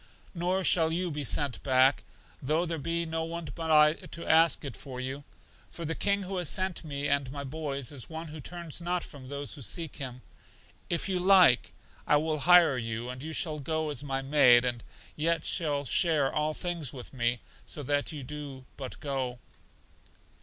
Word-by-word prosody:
Nor 180 +2 0
shall 165 -3 +4
you 175 +1 -1
be 145 -1 -3
sent 140 0 +1
back, 130 0 +4 0.4
though 155 +6 +1
there 165 -2 -3
be 165 +3 -1
no 160 0 -2
one 165 0 -5
but 165 -1 -5
I 150 -1 +6
to 170 +1 -9
ask 160 -1 +4
it 135 -6 -5
for 130 +4 -8
you; 130 +3 -4 0.5
for 170 - -7
the 165 - -1
King 200 +3 +1
who 190 0 -4
has 175 -4 +1
sent 185 -2 0
for 160 - -12
me 145 -1 -3
and 140 -2 0
my 140 0 -5
boys 140 -2 -4
is 135 -5 -6
One 160 0 -6
who 155 0 -8
turns 170 +2 -5
not 175 0 -1
from 135 -4 -10
those 140 +1 -4
who 145 - -9
seek 155 +8 -2
Him. 125 -2 -6 0.7
If 170 +2 0
you 185 -2 0
like 180 -8 +5 0.4
I - - +5
will 155 0 -1
hire 170 -4 +6
you, 115 +1 -4
and 130 0 -8
you 160 +3 -6
shall 155 -1 -2
go 155 +1 -2
as 145 -1 -4
my 135 -1 -2
maid, 130 -4 +6
and 120 -2 -2 0.3
yet 165 +2 0
shall 145 -5 0
share 150 -2 +2
all 150 0 0
things 170 -7 -2
with 125 0 -9
me, 120 -1 0 0.3
so 145 - -4
that 145 +1 0
you 150 -3 -6
do 140 -2 -8
but 130 -2 -7
go. 135 -4 -2
150 Hz, 195 wpm, -29 LUFS, 135-165 Hz, 0.7 s, I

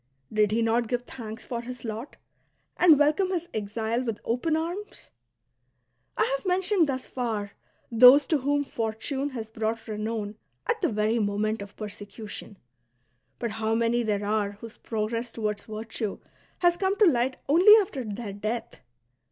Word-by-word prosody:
Did 210 -1 +3
he 225 +2 +1
not 230 +1 +2
give 245 +1 -1
thanks 225 -3 -8
for 235 -2 -3
his 250 0 -8
lot, 225 +5 -6 0.6
and 335 -4 +7
welcome 305 +6 +3
his 350 -2 -2
exile 220 +3 -2
with 225 -4 -3
open 280 +7 +1
amis? 350 +6 -5 1.1
I - - +4
have - - -6
mentioned 370 -3 +2
thus 260 -1 -2
far 220 -5 -3 0.4
those 250 +5 +8
to 310 - +1
whom 285 +2 +1
Fortune 240 +4 -3
has 225 -5 -6
brought 225 +1 -3
renown 215 -1 -3 0.3
at - - 0
the - - +3
verj' 215 +1 +1
moment 210 +1 -1
of 200 0 -9
persecution; 205 0 -8 0.8
but 235 -2 -3
how 220 0 -1
many 235 +1 +2
there 210 -3 -1
are 205 -1 0
whose 225 +2 -11
progress 230 +2 -3
toward 210 -2 -2
virtue 215 0 -4 0.4
has 350 -1 +3
come 385 +1 0
to 425 - +6
light 260 -5 +2
only 360 +9 +8
after 365 -10 -2
their 210 -1 -5
death 215 +3 -4
230 Hz, 155 wpm, -27 LUFS, 215-275 Hz, 1.1 s, those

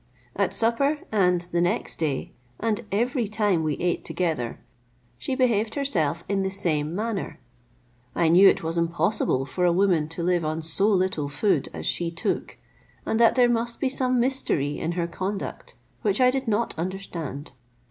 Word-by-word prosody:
At - - +1
supper, 255 +6 +2
and 180 -4 +3
the 170 - +1
next 175 - 0
day, 150 -5 -2 0.3
and 225 +1 -1
every 235 +3 0
time 205 -5 +1
we 155 -2 -1
ate 175 0 -1
together, 160 -10 -2 0.6
she 260 - -2
behaved 225 -4 +1
herself 170 - 0
in 200 0 0
the 190 - 0
same 165 -5 0
manner. 215 -1 -3 0.8
I 170 - +2
knew 185 +4 +8
it - - 0
was 165 +1 -1
impossible 170 -4 0
for 180 +7 -3
a 175 - +4
woman 175 -4 +2
to 165 +1 -3
live 175 -1 +1
on 155 +1 -2
so 165 +6 +4
little 185 -8 +1
food 170 +9 0
as - - -7
she 170 -1 0
took, 165 -1 -3 0.5
and 220 - 0
that 230 -1 +5
there 250 -1 +5
must 235 0 -1
be 270 - +1
some 255 -1 +1
mystery 235 - 0
in 165 +2 -2
her 170 -1 -1
conduct, 190 +4 -5 0.3
which 205 -3 +1
I 250 0 +5
did 265 -1 -3
not 225 +2 0
understand. 170 -6 -5
185 Hz, 170 wpm, -25 LUFS, 165-225 Hz, 0.8 s, knew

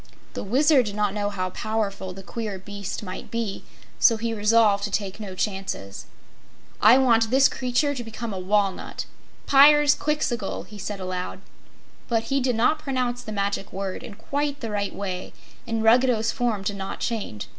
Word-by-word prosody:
The - - -4
Wizard 265 +3 +4
did 205 - -4
not 210 -2 0
know 205 -1 -1
how 185 -2 -3
powerful 210 -3 -3
the 195 +1 -10
queer 215 -1 -5
beast 200 +1 -6
might 185 -2 -7
be, 230 -4 -3 0.4
so 230 -3 +5
he 230 +1 -2
resolved 210 -1 +3
to - - -3
take 200 0 -3
no 195 -3 -7
chances. 190 - -4 0.7
"I 225 +5 +8
want 230 -4 +4
this 265 +3 +6
creature 255 +3 0
to 250 -3 -5
become 225 -1 -6
a 190 - -4
walnut 195 +1 -1 0.4
Pyrzqxgl!" 290 -4 +4
he 210 -1 -11
said 200 +1 -5
aloud. 185 0 -4 0.7
But 225 -2 +1
he 275 - +3
did 250 -2 +1
not 250 +8 +2
pronounce 255 -4 -2
the 225 - -8
Magic 200 -1 -2
Word 190 -1 -4
in 210 - -9
quite 285 +5 -2
the 225 -3 -4
right 205 -1 -2
way, 185 -2 -5 0.3
and 225 -1 -1
Ruggedo's 230 0 +4
form 235 -6 -1
did 200 0 -2
not 195 0 -5
change. 210 - -3
215 Hz, 170 wpm, -24 LUFS, 200-245 Hz, 0.7 s, I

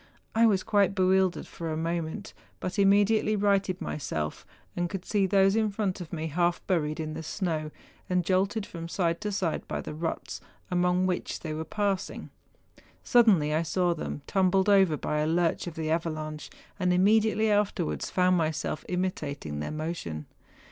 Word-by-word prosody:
I 230 +1 +5
was 195 -4 +2
quite 200 -1 +2
bewildered 185 -1 +2
for 165 -1 -6
a 155 - -2
moment, 165 +4 -3 0.3
but 185 - -3
im¬ 200 - +5
mediately 210 +2 +3
righted 195 -2 +1
myself, 80 - -4 0.3
and 175 0 -1
could 190 +1 -5
see 200 -3 +1
those 195 +1 +4
in 220 -1 +2
front 195 -2 -2
of 170 - -8
me 160 -2 -3
half 175 +2 +1
buried 155 -5 0
in 155 -1 -3
the 160 - -5
snow, 160 -2 -2 0.4
and 180 -2 +1
jolted 195 +3 +1
from 165 -3 -7
side 170 0 -1
to 210 -1 -2
side 185 -5 -2
by - - -3
the - - -6
ruts, 165 +2 -4 0.3
among 180 +1 +2
which 180 -1 -2
they 155 -2 -4
were 155 +1 -3
passing. 200 +2 -2 0.7
Suddenly 200 - +4
I 155 - +2
saw 175 +1 +1
them 150 -3 -5
tumbled 190 0 +2
over 190 -6 +5
by 150 - -2
a 150 - +1
lurch 170 +1 +1
of 170 - -6
the 160 -1 -2
avalanche, 155 -2 -3 0.3
and 180 -2 +2
immediately 215 +3 +3
afterwards 205 - 0
found 185 0 +3
myself 155 -2 -1
imitating 150 - -3
their 75 - -3
motion. 155 - -4
180 Hz, 170 wpm, -28 LUFS, 160-195 Hz, 0.7 s, I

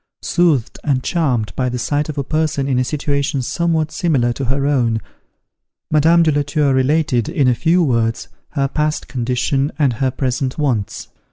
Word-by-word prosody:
Soothed 165 -9 +1
and 135 -4 0
charmed 130 - -1
by 125 -1 0
the 125 - -3
sight 145 +5 -1
of 150 - -5
a 140 - 0
person 155 -2 -1
in 130 -2 +1
a - - +2
situation 140 -1 -1
somewhat 160 +2 0
similar 150 -9 +1
to 135 - -4
her 135 +2 0
own, 120 -6 +1 0.9
Madame 165 +3 +5
de 160 - +3
la 145 0 +1
Tour 145 -1 +1
related, 130 -2 +1
in 155 -6 +1
a 125 - +4
few 165 +9 +2
words, 115 -5 0 0.3
her 140 -3 +1
past 150 +2 -2
condition 130 +3 -1
and 140 -5 +2
her 130 +3 0
present 130 0 -2
wants. 125 -9 -2
140 Hz, 175 wpm, -18 LUFS, 125-155 Hz, 0.9 s, Madame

